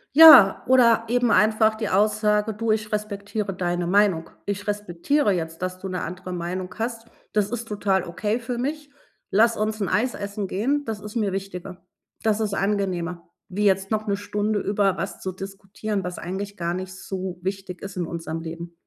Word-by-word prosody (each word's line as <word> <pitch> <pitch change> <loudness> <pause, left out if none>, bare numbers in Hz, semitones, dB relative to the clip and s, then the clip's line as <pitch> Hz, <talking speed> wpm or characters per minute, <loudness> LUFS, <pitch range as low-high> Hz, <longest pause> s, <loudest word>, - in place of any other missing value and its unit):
Ja, 290 -11 +10
oder 235 -3 +5
eben 245 0 +2
einfach 220 +1 +4
die 220 -1 -3
Aussage: 210 +1 +2
„Du, 225 +1 -2
ich 215 -1 -1
respektiere 205 -1 -3
deine 175 -1 -1
Meinung. 190 -3 +2 0.2
Ich 205 0 -3
respektiere 205 - 0
jetzt, 165 -2 -3
dass 185 0 -3
du 195 - -6
'ne 185 -1 -3
andere 180 +2 -6
Meinung 180 +1 -4
hast. 230 0 -3 0.3
Das 210 -1 +1
ist 235 -1 -4
total 200 -3 0
okay 210 +6 -2
für 240 +1 -4
mich. 290 +4 -3 0.4
Lass 230 +3 +4
uns 215 0 -1
'n 195 - 0
Eis 245 +3 +1
essen 200 -1 -4
gehen, 275 +9 0
das 220 -2 -4
ist 210 0 -9
mir 205 -4 +1
wichtiger.“ 190 -2 -6 0.4
Das 220 -1 +1
ist 210 -2 -1
angenehmer, 185 -4 -1 0.2
wie 205 +3 -1
jetzt 195 0 +2
noch 215 0 -1
'ne 200 - +1
Stunde 205 +1 -1
über 200 -2 +1
was 195 - -5
zu 190 - -3
diskutieren, 195 +2 -5
was 180 0 -5
eigentlich 200 +3 -5
gar 170 -1 -2
nicht 185 +1 -5
so 190 -2 -5
wichtig 190 -1 -5
ist 195 -1 -7
in 175 - -1
unserem 165 -1 -5
Leben. 170 +1 -7
200 Hz, 185 wpm, -24 LUFS, 185-215 Hz, 0.4 s, Ja